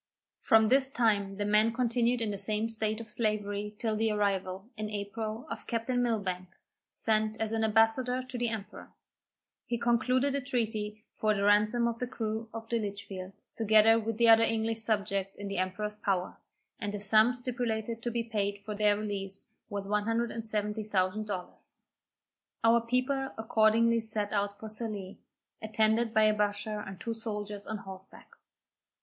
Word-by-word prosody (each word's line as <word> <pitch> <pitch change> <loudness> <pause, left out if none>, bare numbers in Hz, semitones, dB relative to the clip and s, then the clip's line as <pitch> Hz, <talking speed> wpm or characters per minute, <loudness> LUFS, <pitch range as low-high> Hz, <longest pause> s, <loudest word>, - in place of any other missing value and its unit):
From 220 0 +5
this 265 +1 +5
time 205 -6 +1
the 205 - -1
men 210 +2 +4
continued 240 0 +1
in 215 - -1
the 200 - -3
same 215 +2 -1
state 220 -1 0
of 225 -2 -9
slavery 210 -2 -1
till 220 -1 -1
the 220 +1 +1
arrival, 195 -1 -1
in 215 -1 -4
April, 215 +2 -4
of - - -7
Captain 245 +1 0
Milbank, 195 -6 -1 0.4
sent 215 0 0
as 220 -1 -1
an 225 0 0
ambassador 225 +4 +3
to 255 0 -10
the 240 -1 +1
emperor. 220 -3 -7 0.8
He 235 - -1
concluded 250 +4 +2
a 280 - -1
treaty 215 -5 -2
for 215 -1 +2
the 200 - -1
ransom 215 +4 +4
of 230 0 -3
the 250 - -2
crew 220 -1 -3
of 225 0 -7
the 235 0 0
Litchfield, 200 -2 -6 0.2
together 220 +1 +5
with 225 -1 -3
the 235 0 +4
other 225 0 +8
English 225 0 0
subjects 200 -3 -1
in 205 - -6
the 195 - -2
emperor's 210 +3 -2
power, 195 -4 -1 0.4
and 205 -3 -3
the 205 - -4
sum 215 +4 +4
stipulated 235 -2 -2
to 240 - -2
be 235 0 -1
paid 205 -3 -1
for 215 - -4
their 205 0 +3
release, 195 -2 -4 0.2
was 200 -2 -4
170,000 215 -2 -1
dollars. 185 -3 -7 0.9
Our 230 +1 +5
people 255 +3 0
accordingly 225 +1 +3
set 215 -2 -3
out 200 0 -1
for 220 - -7
Sallee, 215 -3 -5 0.4
attended 220 +1 +1
by 220 -1 +4
a 215 0 +5
bashaw 210 0 -1
and 190 -1 -8
two 230 +3 -3
soldiers 210 -2 -5
on 220 - -3
horseback. 190 -1 -12
215 Hz, 165 wpm, -30 LUFS, 205-230 Hz, 0.9 s, other